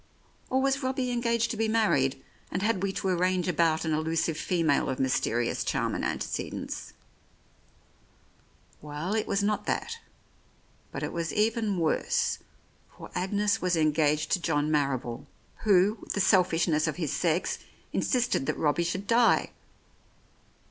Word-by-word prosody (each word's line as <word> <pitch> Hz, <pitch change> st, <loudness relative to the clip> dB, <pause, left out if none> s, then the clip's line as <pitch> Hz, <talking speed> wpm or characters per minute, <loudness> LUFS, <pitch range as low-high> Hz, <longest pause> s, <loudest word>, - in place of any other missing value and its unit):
Or 260 Hz, -, +2 dB
was 275 Hz, +1 st, +1 dB
Robbie 260 Hz, -1 st, -1 dB
engaged 235 Hz, -1 st, +1 dB
to 225 Hz, -, -4 dB
be 225 Hz, 0 st, +1 dB
married, 205 Hz, -12 st, +1 dB, 0.3 s
and 180 Hz, -, -2 dB
had 210 Hz, -3 st, +1 dB
we 195 Hz, 0 st, 0 dB
to 190 Hz, -, -3 dB
arrange 185 Hz, 0 st, +1 dB
about 165 Hz, -2 st, +2 dB
an 160 Hz, -, 0 dB
elusive 160 Hz, +1 st, 0 dB
female 160 Hz, -2 st, +1 dB
of 130 Hz, -, -2 dB
mysterious 120 Hz, -2 st, 0 dB
charm -, -, -1 dB
and -, -, -3 dB
antecedents?... -, -, -4 dB, 1.9 s
Well, 150 Hz, +6 st, -4 dB
it 220 Hz, -1 st, 0 dB
was 200 Hz, +1 st, 0 dB
not 210 Hz, +1 st, -1 dB
that, 460 Hz, -, -2 dB, 0.9 s
but -, -, -5 dB
it -, -, -3 dB
was 170 Hz, -1 st, -2 dB
even 220 Hz, -2 st, +1 dB
worse, 475 Hz, -, +1 dB, 0.6 s
for -, -, -10 dB
Agnes 205 Hz, +4 st, 0 dB
was 180 Hz, -2 st, +1 dB
engaged 155 Hz, -1 st, +2 dB
to 180 Hz, -, +2 dB
John 150 Hz, -2 st, 0 dB
Marrible, 135 Hz, -3 st, -1 dB, 0.4 s
who, 200 Hz, +1 st, +4 dB
with -, -, -5 dB
the -, -, -2 dB
selfishness 170 Hz, -5 st, +3 dB
of 155 Hz, -, -1 dB
his 155 Hz, -5 st, -2 dB
sex, 170 Hz, +3 st, 0 dB, 0.3 s
insisted 245 Hz, -, +1 dB
that -, -, -1 dB
Robbie 155 Hz, +2 st, +1 dB
should 185 Hz, +4 st, -3 dB
die. 235 Hz, +2 st, +3 dB
180 Hz, 145 wpm, -28 LUFS, 155-220 Hz, 1.9 s, who